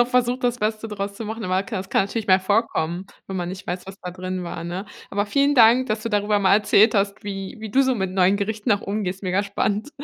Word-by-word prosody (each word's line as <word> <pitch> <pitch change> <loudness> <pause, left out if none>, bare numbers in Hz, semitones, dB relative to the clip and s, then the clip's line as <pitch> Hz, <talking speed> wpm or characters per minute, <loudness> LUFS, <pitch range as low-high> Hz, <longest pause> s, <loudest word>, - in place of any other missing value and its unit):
noch 240 - +5
versucht, 250 0 +1
das 245 0 +1
Beste 215 +1 -1
draus 200 -1 -4
zu 225 - -6
machen, 220 +1 -5
aber 185 +1 +1
ka 215 - -5
das 190 +1 -6
kann - - +3
natürlich 210 +1 -4
mal 185 0 +6
vorkommen, 190 -3 0 0.2
wenn 190 - -5
man 175 -1 -2
nicht 185 +2 -8
weiß, 180 +1 -4
was 195 0 -10
da 180 - -6
drin 185 0 -4
war, 170 -1 -6
ne? 180 +4 -5 0.2
Aber 205 +1 0
vielen 280 +5 +2
Dank, 240 +3 +6
dass 215 0 -1
du - - -1
darüber 210 -1 +1
mal 195 0 +4
erzählt 215 +2 +4
hast, 200 +1 0
wie 195 +1 -5
wie 220 -1 -7
du 270 +5 +4
so 260 -1 +2
mit 190 -3 -2
neuen 190 +1 +3
Gerichten 210 +2 -3
noch 205 - +3
umgehst. 195 -2 -3
Mega 185 +2 +1
spannend. 210 +5 -2
205 Hz, 255 wpm, -23 LUFS, 190-220 Hz, 0.2 s, mal